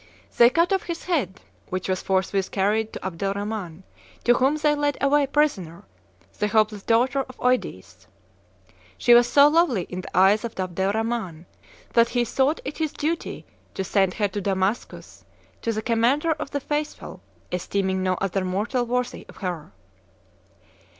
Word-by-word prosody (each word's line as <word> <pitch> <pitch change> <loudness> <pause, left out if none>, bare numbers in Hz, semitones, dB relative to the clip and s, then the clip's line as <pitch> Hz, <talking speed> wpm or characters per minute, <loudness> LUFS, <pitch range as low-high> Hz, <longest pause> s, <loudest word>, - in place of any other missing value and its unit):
They 235 0 +7
cut 335 +8 +2
off 385 - +1
his 340 -1 -5
head, 265 - -2 0.3
which 185 0 -3
was 185 -1 -1
forthwith 190 0 0
carried 210 +3 0
to - - -7
Abdel 195 +2 -2
Rhaman, 200 -4 -5 0.4
to 240 - +5
whom 265 +4 +2
they 300 -1 +2
led 290 -1 0
away 280 0 +3
prisoner 220 - 0 0.6
the 210 - +1
hapless 215 -1 +1
daughter 250 +6 +2
of 255 - -12
Eudes. 250 - -2 0.9
She 240 - +5
was 240 0 +6
so 285 +3 +6
lovely 295 - +2
in 180 +2 -6
the 180 - -7
eyes 195 +3 +5
of 230 -4 -6
Abdel 185 +1 -1
Rhaman, 220 -7 -3 0.5
that 235 0 +4
he 240 -1 0
thought 270 +6 0
it 280 +4 -6
his 315 -2 -1
duty 325 +3 -3 0.3
to 190 - -2
send 190 -1 +1
her 205 - +1
to 205 +1 -4
Damascus, 195 +3 -3 0.4
to 230 - -1
the 215 0 -3
commander 245 +8 +2
of 295 - -3
the 285 - -2
faithful, 295 +2 -4 0.3
esteeming 190 +1 -1
no 185 0 +1
other 195 0 -2
mortal 215 +7 -1
worthy 250 +1 -2
of - - -14
her." 170 - -4
220 Hz, 165 wpm, -24 LUFS, 190-275 Hz, 0.9 s, They